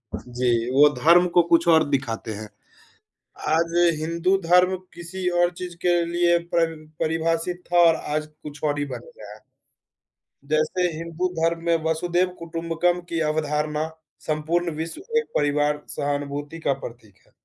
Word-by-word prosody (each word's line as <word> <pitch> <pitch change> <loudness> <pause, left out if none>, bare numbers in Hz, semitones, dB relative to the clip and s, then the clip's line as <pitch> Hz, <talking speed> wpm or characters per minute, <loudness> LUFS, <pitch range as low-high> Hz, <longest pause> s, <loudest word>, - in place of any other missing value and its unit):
जी, 120 -1 -1
वो 145 +3 +6
धर्म 175 +3 +5
को 175 - +8
कुछ 170 0 +4
और 160 -1 +6
दिखाते 115 -5 -2
हैं। 105 0 -8 1.0
आज 165 +1 +1 0.3
हिंदू 170 +4 +1
धर्म 180 +2 +4 0.2
किसी 180 +2 -5
और 175 0 +3
चीज़ 180 -1 -6
के 175 -1 +3
लिए 175 0 +2 0.2
पर 165 -1 +2 0.3
परिभाषित 165 +2 -1
था 175 - +3
और 165 - +4 0.2
आज 155 0 -1 0.2
कुछ 150 0 -10
और 145 -1 0
ही 145 - -1
बन 125 -3 -6 0.2
गया 105 -1 -11
है। 110 - -14 1.1
जैसे 155 +4 +1
हिंदू 170 +2 -2
धर्म 165 0 0
में 170 - +3
वसुधैव 175 +3 +1
कुटुम्बकम 170 +1 -1
की 165 -1 -1
अवधारणा 150 0 -1 0.4
संपूर्ण 165 +3 0
विश्व 165 - -5 0.2
एक 460 - -4
परिवार, 145 0 +1
सहानुभूति 145 +2 -3
का 140 - +1
प्रतीक 115 -6 -11
है। - - -28
165 Hz, 150 wpm, -24 LUFS, 145-170 Hz, 1.1 s, को